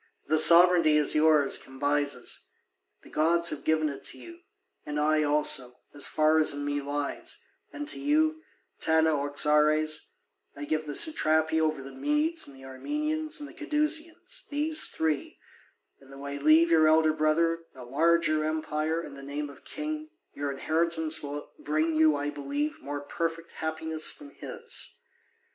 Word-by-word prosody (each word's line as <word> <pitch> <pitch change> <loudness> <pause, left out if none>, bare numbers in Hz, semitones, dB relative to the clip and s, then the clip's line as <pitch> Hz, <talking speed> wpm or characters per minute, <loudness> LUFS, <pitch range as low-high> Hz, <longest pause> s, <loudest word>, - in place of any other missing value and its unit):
The 155 - +3
sovereignty 170 -2 +7
is 150 -1 +2
yours, 155 -2 +3
Cambyses; 145 -1 -3 0.6
the - - -16
gods 170 +2 +3
have 145 -2 -6
given 155 0 +1
it 140 -2 -7
to - - -1
you, 340 0 -12 0.4
and 150 0 -4
I 155 +1 +2
also, 145 -4 +2 0.2
as 145 - 0
far 155 +1 +2
as 155 -2 +2
in 145 0 -5
me 145 0 -2
lies; 145 0 -5 0.3
and 295 0 -7
to - - -2
you, 310 +2 +1 0.4
Tanaoxares, 155 0 +2 0.4
I 145 - -7
give 155 +1 -2
the 145 - -4
satrapy 160 - +2
over 155 -3 -1
the 135 - -10
Medes 300 +4 -1
and 140 - -12
the 135 - -13
Armenians 305 - -3
and 295 - -7
the - - -14
Cadousians, 320 +8 -1
these 305 +2 +3
three; 155 -3 -3 0.6
and 135 0 -19
though 135 +1 -10
I 140 0 -5
leave 155 +4 +4
your 160 -1 +5
elder 155 0 +4
brother 165 +2 +1 0.2
a 130 - -10
larger 155 +3 +1
empire 155 +1 -2
and 145 -4 -10
the 140 - -11
name 145 +1 -5
of 140 - -18
king, 310 +1 -6 0.2
your 145 0 -4
inheritance 160 +2 0
will 145 0 -7
bring 155 +2 -1
you, 155 -1 +4
I 145 +1 -3
believe, 145 +1 -4
more 145 0 -5
perfect 165 +3 -4
happiness 160 0 -2
than 290 -1 -12
his. 470 +7 -7
155 Hz, 155 wpm, -27 LUFS, 145-170 Hz, 0.6 s, sovereignty